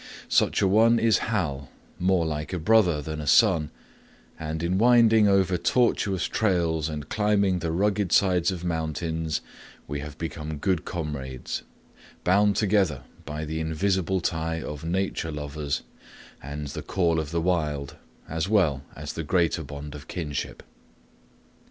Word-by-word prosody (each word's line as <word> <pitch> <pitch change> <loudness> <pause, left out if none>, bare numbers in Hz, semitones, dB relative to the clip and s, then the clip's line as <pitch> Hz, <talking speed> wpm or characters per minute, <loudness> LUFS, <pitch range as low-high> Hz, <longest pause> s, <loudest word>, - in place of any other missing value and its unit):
Such - - +3
a - - +4
one 115 +4 +5
is 115 -1 +3
Hal, 70 - -2 0.3
more 90 -2 +2
like 75 +1 -3
a - - 0
brother 90 -4 +3
than 75 +1 -5
a 75 - -7
son, 85 -9 +4 0.7
and 80 +1 -4
in 90 +3 +1
winding 115 -2 +6
over 95 -2 +3
tortuous 100 -3 +1
trails 85 -7 0
and 75 -2 -5
climbing 100 -3 +2
the 85 -1 -2
rugged 100 +1 +1
sides 90 -3 +3
of 90 -3 -4
mountains 80 -1 -2 0.5
we 70 0 -3
have 75 +1 -8
become 80 -2 -5
good 90 +1 0
comrades; 70 -6 -4 0.6
bound 100 +2 +3
together 95 - +1 0.2
by 75 +2 -4
the 80 +1 -3
invisible 95 +3 0
tie 80 -1 -1
of 75 -2 -6
"Nature 85 -1 -1
Lovers" 75 0 -3 0.6
and 70 +1 -6
the - - -5
"Call 85 -3 +1
of 80 -2 -3
the 85 +1 -1
Wild," 75 -5 -1 0.3
as 80 +4 -2
well 85 -11 +3
as 75 0 -6
the 80 - -4
greater 85 0 +1
bond 70 0 -8
of 75 -1 -10
kinship. 75 -6 -4
80 Hz, 145 wpm, -26 LUFS, 75-95 Hz, 0.7 s, winding